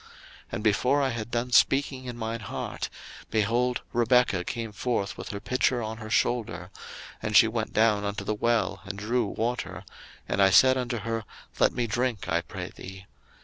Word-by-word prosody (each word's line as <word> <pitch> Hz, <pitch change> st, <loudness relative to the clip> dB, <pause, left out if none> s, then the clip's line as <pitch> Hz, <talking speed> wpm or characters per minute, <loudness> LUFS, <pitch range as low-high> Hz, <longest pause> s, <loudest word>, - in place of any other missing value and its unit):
01:024:045 -, -, -20 dB, 0.4 s
And -, -, -3 dB
before 125 Hz, +6 st, +3 dB
I 135 Hz, -, +2 dB
had 115 Hz, -2 st, -4 dB
done 120 Hz, +1 st, -2 dB
speaking 135 Hz, 0 st, +3 dB
in 120 Hz, -1 st, -6 dB
mine 115 Hz, 0 st, -3 dB
heart, 100 Hz, -, -5 dB, 0.4 s
behold, 120 Hz, +3 st, +1 dB
Rebekah 120 Hz, -5 st, +3 dB
came 115 Hz, +1 st, -4 dB
forth 105 Hz, -2 st, -2 dB
with 95 Hz, +2 st, -7 dB
her 100 Hz, -3 st, -4 dB
pitcher 125 Hz, +1 st, +1 dB
on 110 Hz, 0 st, -4 dB
her 110 Hz, -1 st, -8 dB
shoulder; 100 Hz, -7 st, 0 dB, 0.5 s
and 105 Hz, -1 st, +3 dB
she 115 Hz, -, +8 dB
went 110 Hz, -1 st, -2 dB
down 110 Hz, -2 st, +3 dB
unto 100 Hz, +1 st, -3 dB
the 110 Hz, -, -1 dB
well, 105 Hz, -3 st, 0 dB
and 95 Hz, 0 st, -6 dB
drew 115 Hz, +2 st, 0 dB
water: 120 Hz, +4 st, -3 dB, 0.4 s
and 100 Hz, -, 0 dB
I 95 Hz, -, +7 dB
said 130 Hz, +7 st, +6 dB
unto 125 Hz, -2 st, -2 dB
her, 115 Hz, +1 st, -2 dB, 0.4 s
Let -, -, +5 dB
me 120 Hz, -1 st, -1 dB
drink, 120 Hz, -1 st, -1 dB
I 85 Hz, +1 st, +1 dB
pray -, -, -7 dB
thee. 95 Hz, 0 st, -10 dB
115 Hz, 185 wpm, -27 LUFS, 105-125 Hz, 0.5 s, she